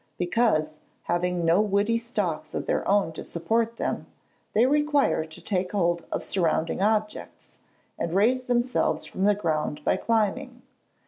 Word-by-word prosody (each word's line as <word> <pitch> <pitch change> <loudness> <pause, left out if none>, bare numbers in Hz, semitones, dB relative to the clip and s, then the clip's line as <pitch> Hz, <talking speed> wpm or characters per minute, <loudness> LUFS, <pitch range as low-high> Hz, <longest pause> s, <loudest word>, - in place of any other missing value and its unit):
_ - - -39
Because, 175 -6 +1 0.2
having 175 0 -1
no 170 +5 +4
woody 210 +2 +1
stalks 180 -10 -3
of - - -3
their - - -1
own 200 -4 +2
to - - -7
support 225 +6 -1
them, - - -3 0.5
they 225 +3 +4
require 290 - +2
to 160 0 -10
take 185 -2 -2
hold 170 -4 0
of - - -2
surrounding 165 -2 0
objects, 215 +1 -2 0.4
and 170 +1 -2
raise 250 +6 +2
themselves 245 0 0
from 190 - -2
the 205 0 +4
ground 155 -5 -2
by - - +2
climbing. 245 +3 -1
200 Hz, 150 wpm, -26 LUFS, 170-230 Hz, 0.5 s, no